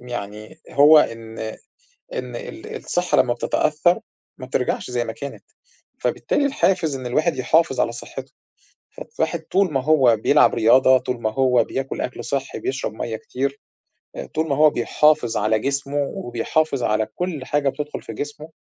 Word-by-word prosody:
م 125 Hz, -, -13 dB
يعني 105 Hz, -2 st, -7 dB
هو 150 Hz, +2 st, +7 dB
إن 115 Hz, -4 st, -2 dB, 0.8 s
إن -, -, -5 dB
ال 460 Hz, -2 st, -8 dB
الصحّة 180 Hz, -, -1 dB
لمّا 125 Hz, -1 st, +4 dB
بتتأثّر 155 Hz, +7 st, +1 dB, 0.4 s
ما 130 Hz, -, -6 dB
بترجعش 125 Hz, -1 st, -2 dB
زي 120 Hz, -1 st, -1 dB
ما 115 Hz, -, -5 dB
كانت، 140 Hz, +3 st, -8 dB, 0.6 s
فبالتالي 290 Hz, -, 0 dB
الحافز 190 Hz, -, +1 dB
إن 130 Hz, -1 st, -7 dB
الواحد 155 Hz, +4 st, +1 dB
يحافظ 145 Hz, +2 st, +2 dB
على 115 Hz, -, 0 dB
صحّته، 120 Hz, -, -9 dB, 0.6 s
فالواحد 160 Hz, +1 st, -3 dB
طول 185 Hz, 0 st, +1 dB
ما 135 Hz, -, +1 dB
هو 135 Hz, -7 st, +5 dB
بيلعب 145 Hz, +7 st, +4 dB
رياضة، 130 Hz, +3 st, +5 dB
طول 125 Hz, -2 st, -4 dB
ما 110 Hz, -, +1 dB
هو 125 Hz, -3 st, +3 dB
بياكُل 135 Hz, +3 st, -4 dB
أكل 125 Hz, -, -5 dB
صحّي، 135 Hz, -1 st, -3 dB
بيشرب 130 Hz, -4 st, -3 dB
مَيّة 110 Hz, 0 st, -4 dB
كتير، 140 Hz, +5 st, -4 dB, 0.6 s
آآ -, -, -5 dB
طول 160 Hz, +1 st, -2 dB
ما 140 Hz, -, +1 dB
هو 155 Hz, 0 st, +6 dB
بيحافظ 150 Hz, -5 st, +2 dB
على 110 Hz, +1 st, +1 dB
جسمه 140 Hz, +2 st, -2 dB, 0.2 s
وبيحافظ 125 Hz, +3 st, -1 dB
على 110 Hz, 0 st, +1 dB
كل 175 Hz, -7 st, -3 dB
حاجة 145 Hz, 0 st, +1 dB
بتدخُل 150 Hz, +2 st, -5 dB
في 115 Hz, -, -8 dB
جسمه 150 Hz, +6 st, -6 dB
135 Hz, 160 wpm, -22 LUFS, 120-155 Hz, 0.8 s, هو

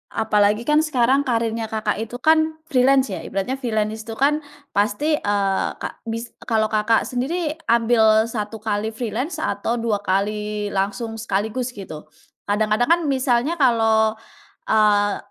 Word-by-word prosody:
apalagi 210 Hz, -1 st, +2 dB
kan 300 Hz, +4 st, +3 dB
sekarang 270 Hz, -1 st, +2 dB
karirnya 230 Hz, -2 st, -1 dB
Kakak 215 Hz, -1 st, -2 dB
itu 225 Hz, +2 st, -5 dB
kan 315 Hz, +1 st, +2 dB
freelance 265 Hz, -1 st, +3 dB
ya. 190 Hz, -, -5 dB
Ibaratnya 195 Hz, +8 st, -3 dB
freelance 220 Hz, -3 st, -2 dB
itu 225 Hz, -, -6 dB
kan 290 Hz, +5 st, +1 dB, 0.3 s
pasti, 215 Hz, +10 st, +1 dB
eee, 200 Hz, -3 st, 0 dB
kak -, -, -4 dB
bis 230 Hz, +1 st, -4 dB
eee, -, -, -19 dB
kalau 220 Hz, -1 st, +1 dB
Kakak 215 Hz, +1 st, +2 dB
sendiri 305 Hz, +5 st, -2 dB
ambil 225 Hz, -2 st, +3 dB
satu 215 Hz, -1 st, -5 dB
kali 215 Hz, 0 st, -2 dB
freelance 250 Hz, -, -3 dB
atau 200 Hz, -3 st, -1 dB
dua 225 Hz, -3 st, 0 dB
kali 210 Hz, +2 st, -1 dB
langsung 205 Hz, +4 st, -2 dB
sekaligus 220 Hz, +4 st, -2 dB
gitu? 175 Hz, -8 st, -9 dB, 0.4 s
Kadang-kadang 215 Hz, +3 st, +1 dB
kan 340 Hz, +1 st, +4 dB
misalnya 265 Hz, +3 st, +1 dB
kalau, 225 Hz, -5 st, +3 dB, 0.6 s
eee, 205 Hz, -1 st, +3 dB
225 Hz, 140 wpm, -21 LUFS, 210-255 Hz, 0.6 s, kan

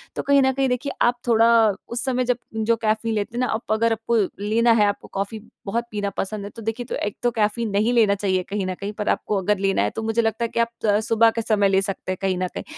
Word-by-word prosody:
तो -, -, -2 dB
कहीं 280 Hz, 0 st, +4 dB
न 265 Hz, 0 st, +3 dB
कहीं 270 Hz, 0 st, +1 dB
देखिए 250 Hz, +3 st, -2 dB
आप 240 Hz, +1 st, +3 dB
थोड़ा 230 Hz, -1 st, +5 dB, 0.2 s
उस 235 Hz, +1 st, -2 dB
समय 255 Hz, -1 st, 0 dB
जब 250 Hz, 0 st, +1 dB, 0.2 s
जो 220 Hz, +1 st, +2 dB
कैफ़ीन 220 Hz, +1 st, 0 dB
लेते 210 Hz, +3 st, -3 dB
हैं -, -, 0 dB
ना -, -, -2 dB
आप 220 Hz, 0 st, -4 dB
अगर 230 Hz, +1 st, +2 dB
आपको 225 Hz, +1 st, -1 dB, 0.2 s
लेना 225 Hz, +3 st, +2 dB
है -, -, +5 dB
आपको 205 Hz, -, -3 dB
कॉफ़ी 200 Hz, +3 st, -3 dB, 0.3 s
बहुत 230 Hz, +4 st, -1 dB
पीना 205 Hz, -1 st, -2 dB
पसंद 205 Hz, +1 st, -3 dB
है। -, -, -6 dB
तो 230 Hz, -, -8 dB
देखिए 225 Hz, +3 st, -4 dB
एक 205 Hz, -, -6 dB
तो 240 Hz, -, +2 dB
कैफ़ीन 220 Hz, +1 st, 0 dB
नहीं 215 Hz, +4 st, +2 dB
लेना 215 Hz, -4 st, +4 dB
चाहिए 190 Hz, -2 st, 0 dB
कहीं 200 Hz, -1 st, -2 dB
न 185 Hz, -, -2 dB
कहीं, 200 Hz, +2 st, -5 dB
पर 210 Hz, 0 st, -3 dB
आपको 210 Hz, -, 0 dB
अगर 205 Hz, +2 st, +1 dB
लेना 195 Hz, -, +1 dB
है 105 Hz, -, +1 dB
तो 225 Hz, -, -3 dB
मुझे 225 Hz, +1 st, +1 dB
लगता 225 Hz, +1 st, -1 dB
है -, -, -4 dB
कि -, -, -3 dB
आप 230 Hz, 0 st, +2 dB, 0.2 s
त 205 Hz, -1 st, +3 dB
सुबह 225 Hz, +1 st, +4 dB
के 230 Hz, -, -2 dB
समय 210 Hz, -3 st, +2 dB
ले 195 Hz, 0 st, +3 dB
सकते 195 Hz, -1 st, -4 dB
हैं 185 Hz, -, -3 dB
कहीं 190 Hz, -2 st, 0 dB
न 185 Hz, 0 st, -1 dB
कहीं। -, -, -4 dB
220 Hz, 270 wpm, -23 LUFS, 200-235 Hz, 0.3 s, थोड़ा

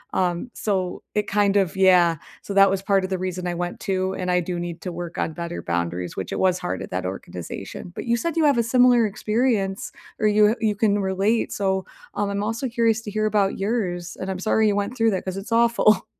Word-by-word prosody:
Um, 180 Hz, +6 st, 0 dB
so 190 Hz, -4 st, -2 dB
it 210 Hz, 0 st, +1 dB
kind 205 Hz, -1 st, +2 dB
of 190 Hz, -3 st, +1 dB
yeah. 180 Hz, -3 st, +5 dB, 0.3 s
So 200 Hz, -, -5 dB
that 195 Hz, 0 st, +6 dB
was 190 Hz, 0 st, -1 dB
part 195 Hz, -1 st, +2 dB
of 185 Hz, -, -3 dB
the 190 Hz, -, -1 dB
reason 185 Hz, 0 st, -3 dB
I 175 Hz, -, -2 dB
went 175 Hz, +1 st, -4 dB
too, 190 Hz, -1 st, -1 dB
and 185 Hz, -1 st, -3 dB
I 180 Hz, 0 st, +3 dB
do 175 Hz, 0 st, -4 dB
need 175 Hz, -1 st, -5 dB
to 180 Hz, -, -4 dB
work 175 Hz, 0 st, -6 dB
on 160 Hz, -, -1 dB
better 170 Hz, +1 st, -5 dB
boundaries 85 Hz, +1 st, -2 dB
which 95 Hz, -, -5 dB
it -, -, -2 dB
was 185 Hz, -1 st, +2 dB
hard 180 Hz, -, -3 dB
at -, -, -9 dB
that 90 Hz, 0 st, -2 dB
organization. 95 Hz, -, -7 dB
But -, -, -5 dB
you 235 Hz, 0 st, +2 dB
said 335 Hz, +6 st, -2 dB
you 320 Hz, -, +4 dB
have 280 Hz, -5 st, +4 dB
a 235 Hz, -, +3 dB
similar 245 Hz, -1 st, +4 dB
experience 210 Hz, -2 st, -1 dB, 0.3 s
or 215 Hz, -, +3 dB
you, 210 Hz, 0 st, +5 dB
uh, 225 Hz, -, +1 dB
you 215 Hz, -2 st, +1 dB
can 205 Hz, 0 st, +2 dB
relate. 195 Hz, +4 st, 0 dB
So, 190 Hz, -1 st, -1 dB, 0.3 s
um, 205 Hz, -1 st, -1 dB
I'm 200 Hz, 0 st, -2 dB
also 225 Hz, +5 st, -2 dB
curious 230 Hz, -2 st, +1 dB
to 210 Hz, -, -7 dB
hear 215 Hz, +1 st, 0 dB
about 205 Hz, -2 st, +1 dB
yours, 190 Hz, -5 st, -2 dB
and 190 Hz, -, -3 dB
I'm 190 Hz, -, -2 dB
sorry 220 Hz, +2 st, +2 dB
you 205 Hz, -, +2 dB
went 205 Hz, +4 st, -2 dB
through 225 Hz, -2 st, +3 dB
that 190 Hz, -, -2 dB
'cause 185 Hz, 0 st, -3 dB
it's 200 Hz, +4 st, -7 dB
awful. 230 Hz, -2 st, +4 dB
195 Hz, 240 wpm, -23 LUFS, 180-215 Hz, 0.3 s, that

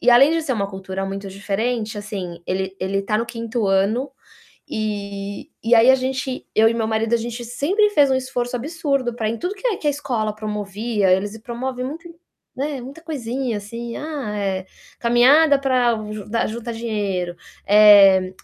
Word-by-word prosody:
e 245 Hz, -, +4 dB
além 270 Hz, +5 st, +7 dB
de 330 Hz, -1 st, 0 dB
ser 275 Hz, -4 st, -1 dB
uma 200 Hz, -4 st, -1 dB
cultura 190 Hz, 0 st, -5 dB
muito 195 Hz, +1 st, -5 dB
diferente, 215 Hz, +3 st, -2 dB
assim, 190 Hz, -5 st, -6 dB
ele 190 Hz, +1 st, -2 dB
ele 195 Hz, +1 st, -1 dB
está 210 Hz, +2 st, 0 dB
no 230 Hz, -, -2 dB
5º 230 Hz, -2 st, -3 dB
ano, 205 Hz, +8 st, +1 dB, 0.6 s
e 200 Hz, -2 st, -4 dB
e 235 Hz, +1 st, +5 dB
aí 235 Hz, +3 st, +7 dB
a -, -, +7 dB
gente 260 Hz, 0 st, -3 dB
eu 220 Hz, +1 st, +6 dB
e 230 Hz, -, -1 dB
meu 225 Hz, -1 st, -1 dB
marido, 220 Hz, +1 st, 0 dB
a -, -, +5 dB
gente 235 Hz, +1 st, -5 dB
sempre 360 Hz, -, +1 dB
fez 290 Hz, -7 st, +4 dB
um -, -, +3 dB
esforço 250 Hz, -1 st, -2 dB
absurdo 275 Hz, -3 st, -1 dB
para 225 Hz, -3 st, -2 dB
em 230 Hz, -, -2 dB
tudo 360 Hz, +3 st, -3 dB
que 415 Hz, +5 st, -4 dB
é 435 Hz, -, +1 dB
que -, -, -6 dB
a -, -, +5 dB
escola 235 Hz, -7 st, -2 dB
promovia. 210 Hz, -1 st, -1 dB
Eles 205 Hz, +4 st, 0 dB
promovem 250 Hz, +2 st, -4 dB
muita 330 Hz, +6 st, -6 dB, 0.5 s
né, 280 Hz, -1 st, -3 dB
muita 275 Hz, +6 st, -10 dB
coisinha 255 Hz, -6 st, -3 dB
assim, 230 Hz, +3 st, -7 dB
ah, 290 Hz, -9 st, -4 dB
é, 190 Hz, -2 st, -2 dB, 0.3 s
caminhada 275 Hz, +5 st, +5 dB
pra 255 Hz, -3 st, +2 dB, 0.2 s
ju 215 Hz, -2 st, -6 dB, 0.3 s
juntar 235 Hz, 0 st, -5 dB
dinheiro, 205 Hz, -6 st, -2 dB, 0.3 s
eh, 200 Hz, -3 st, +7 dB
230 Hz, 180 wpm, -21 LUFS, 205-260 Hz, 0.6 s, além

